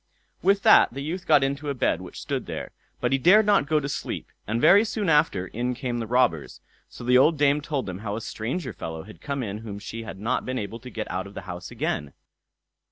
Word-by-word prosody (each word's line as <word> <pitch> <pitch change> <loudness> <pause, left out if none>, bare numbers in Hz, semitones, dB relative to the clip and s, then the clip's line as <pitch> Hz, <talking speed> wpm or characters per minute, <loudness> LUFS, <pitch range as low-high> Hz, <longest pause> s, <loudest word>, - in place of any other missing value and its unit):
With 200 +1 +3
that - - +7
the 135 +3 -6
youth 180 +5 -5
got 140 - +5
into 140 +2 -2
a 140 - -2
bed - - +1
which - - -9
stood - - -3
there, - - -5 0.3
but - - 0
he 135 - +2
dared 200 +10 +6
not 200 -9 +3
go 155 0 +3
to 140 - -4
sleep, 140 - -5 0.2
and 110 +3 0
very 200 - +7
soon 215 -4 -2
after 150 - +3
in 125 +6 -3
came 125 -2 -3
the 115 - -4
robbers; 120 - +1 0.3
so - - -11
the 125 +1 +5
old 155 +4 +4
dame 145 0 +3
told 145 -3 -2
them 95 -1 -6
how 105 -1 -4
a 115 - -4
stranger 125 - -4
fellow 80 -2 -6
had 110 - -14
come 140 -2 -3
in 105 -1 -4
whom 110 -3 -7
she 110 +2 -7
had 110 -4 -8
not 115 +5 -1
been 130 0 -3
able 110 +1 -5
to 125 +2 -10
get 110 -3 -5
out 95 +2 -3
of 100 - -14
the - - -5
house 90 -2 -7
again. 75 -2 -3
125 Hz, 240 wpm, -25 LUFS, 105-150 Hz, 0.3 s, that